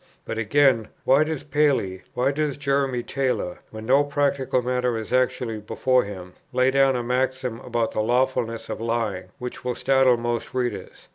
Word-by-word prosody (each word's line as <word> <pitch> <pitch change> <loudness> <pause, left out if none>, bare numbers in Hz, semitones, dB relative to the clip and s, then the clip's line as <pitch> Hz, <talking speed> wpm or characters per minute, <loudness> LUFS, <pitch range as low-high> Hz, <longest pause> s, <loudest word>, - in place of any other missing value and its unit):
But 115 - -4
again, 115 -1 +3 0.2
why 135 +3 +5
does 155 -3 -4
Paley, 140 -11 +1
why 130 +3 +2
does 150 -1 -1
Jeremy 140 -3 0
Taylor, 130 -11 -2
when 110 0 -8
no 135 +4 +4
practical 140 -3 0
matter 125 -1 0
is 110 +2 -5
actually 125 -3 0
before 125 +4 +1
him, 90 -3 -8 0.2
lay 130 +1 +3
down 135 -1 +4
a 120 - -1
maxim 125 -1 -1
about 120 -3 -1
the 110 - -1
lawfulness 120 -1 0
of - - -5
lying, 115 -5 -1
which 125 0 -7
will 125 -1 -2
startle 130 -2 +3
most 120 +1 -3
readers? 120 -7 -4
125 Hz, 165 wpm, -24 LUFS, 115-135 Hz, 0.2 s, why